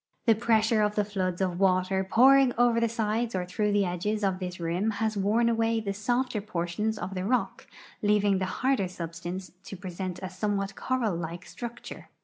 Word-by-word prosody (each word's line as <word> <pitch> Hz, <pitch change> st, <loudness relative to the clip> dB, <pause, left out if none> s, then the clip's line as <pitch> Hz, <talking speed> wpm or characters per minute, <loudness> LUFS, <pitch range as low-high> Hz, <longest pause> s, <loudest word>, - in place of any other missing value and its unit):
The 230 Hz, -, +6 dB
pre.ssure 220 Hz, -1 st, +2 dB
of 210 Hz, 0 st, 0 dB
the 210 Hz, -, +2 dB
Hoods 190 Hz, -3 st, -2 dB
of 180 Hz, -2 st, -1 dB
water 190 Hz, 0 st, +2 dB
pouring 260 Hz, +5 st, +5 dB
over 240 Hz, -1 st, +4 dB
the 230 Hz, 0 st, +1 dB
sides 225 Hz, 0 st, -1 dB
or 180 Hz, -1 st, -1 dB
through 210 Hz, +4 st, -1 dB
the 205 Hz, -1 st, +3 dB
edges 205 Hz, +5 st, -2 dB
of 190 Hz, -2 st, +1 dB
this 180 Hz, -1 st, -5 dB
rim 175 Hz, +5 st, 0 dB
has 220 Hz, 0 st, 0 dB
worn 210 Hz, +4 st, +2 dB
away 230 Hz, 0 st, +1 dB
the 200 Hz, -2 st, -3 dB
softer 240 Hz, +2 st, -1 dB
portions 210 Hz, +2 st, -2 dB
of 190 Hz, -, -5 dB
tbe 190 Hz, +1 st, -3 dB
rock, 250 Hz, -1 st, -1 dB, 0.3 s
leaving 205 Hz, -2 st, +3 dB
tbe 190 Hz, +4 st, -4 dB
barder 260 Hz, -6 st, +2 dB
sul)sta.nce 175 Hz, 0 st, -6 dB
to 195 Hz, 0 st, -8 dB
present 180 Hz, 0 st, -5 dB
a 185 Hz, -, -6 dB
soniewbat 195 Hz, +1 st, -2 dB
coral 235 Hz, -4 st, -1 dB
like 170 Hz, +1 st, -5 dB
structure. 240 Hz, -1 st, -8 dB
205 Hz, 185 wpm, -28 LUFS, 185-225 Hz, 0.3 s, The